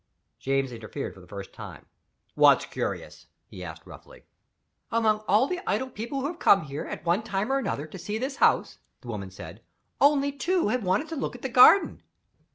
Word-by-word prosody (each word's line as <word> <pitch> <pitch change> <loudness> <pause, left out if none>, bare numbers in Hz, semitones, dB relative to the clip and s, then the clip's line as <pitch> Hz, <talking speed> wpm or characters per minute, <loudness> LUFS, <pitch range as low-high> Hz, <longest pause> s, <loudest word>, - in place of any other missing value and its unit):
James 135 -1 -1
interfered 110 -3 -6
for - - -15
the 90 - -16
first 100 0 -9
time. - - -10 0.5
"What's - - +5
curious?" - - -5 0.2
he 90 - -10
asked 80 -3 -9
roughly. - - -14 0.7
"Among 220 -2 +2
all 215 +6 +4
the 360 +5 -3
idle 260 0 -1
people 235 +6 -4
who - - -3
have 335 +3 -4
come 195 - +5
here, 145 +1 -6
at - - -7
one 175 +5 +2
time 215 +1 -2
or 275 - +2
another, 150 - -3
to 155 +4 -10
see 210 +5 -4
this 265 +4 -4
house," - - +2 0.2
the 125 - -11
woman 100 -4 -5
said, 95 - -11 0.4
"only 285 0 +4
two 335 - 0
have 250 0 -1
wanted 190 +11 0
to 325 - -4
look 275 - -3
at 245 - -12
the 265 - -2
garden." 255 +11 +6
215 Hz, 195 wpm, -26 LUFS, -, 0.7 s, garden